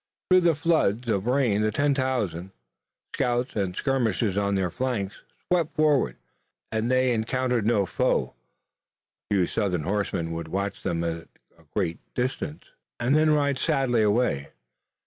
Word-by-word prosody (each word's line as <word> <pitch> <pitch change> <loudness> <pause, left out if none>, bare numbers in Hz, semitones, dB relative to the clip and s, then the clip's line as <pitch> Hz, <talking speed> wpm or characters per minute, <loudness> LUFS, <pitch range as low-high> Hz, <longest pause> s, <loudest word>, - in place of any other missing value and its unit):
Through 185 0 +7
the 170 -2 +3
floods 145 -8 +1
of 100 0 0
rain 125 -5 +2
the 110 - +2
ten 145 +5 +2
thousand, 105 - -2 0.6
scouts 125 0 0
and 95 -4 -1
skirmishers 115 -7 0
on 100 0 +1
their 95 -3 0
flanks, 120 -6 -3 0.3
swept 170 -3 +1
southward, 145 - +3 0.6
and 110 +1 -1
they 130 0 +3
encountered 120 0 0
no 105 -4 +3
foe. - - 0 1.0
A 100 - +1
few 95 -2 +3
Southern 90 -5 -1
horsemen 95 -3 -1
would 80 0 -4
watch 100 +4 -3
them 85 -2 -1
at 85 0 -3 0.3
a 80 -1 -23
great 85 -5 -1 0.2
distance 130 +5 -3 0.4
and 125 +3 +1
then 155 +1 +4
ride 145 -3 +2
sadly 125 -4 +2
away. 105 - +1
115 Hz, 145 wpm, -26 LUFS, 95-130 Hz, 1.0 s, Through